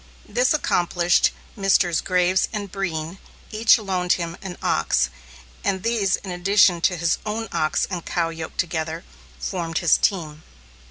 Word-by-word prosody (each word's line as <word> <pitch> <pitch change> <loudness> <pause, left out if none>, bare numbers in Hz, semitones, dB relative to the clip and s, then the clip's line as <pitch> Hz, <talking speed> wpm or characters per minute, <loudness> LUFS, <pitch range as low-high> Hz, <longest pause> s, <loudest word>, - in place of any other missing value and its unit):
This 250 +1 +2
accomplished, 175 - +2 0.3
Messrs. 195 -4 +2
Graves 185 0 +2
and 205 -3 -5
Breen 175 -2 -4 0.3
each 220 +1 +5
loaned 185 -4 0
him 170 -1 -3
an 185 -2 -7
ox, 65 -1 +1 0.5
and 190 -1 -1
these 225 -5 +1
in 190 - -8
addition 180 -1 +3
to 180 +1 +2
his 170 0 0
own 220 +1 -3
ox 155 -2 0
and 180 -4 -5
cow 170 -2 -1
yoked 165 -1 -7
together, 160 -1 -2 0.3
formed 170 -4 -3
his 175 - +4
team. 155 -6 -1
180 Hz, 145 wpm, -23 LUFS, 165-195 Hz, 0.5 s, each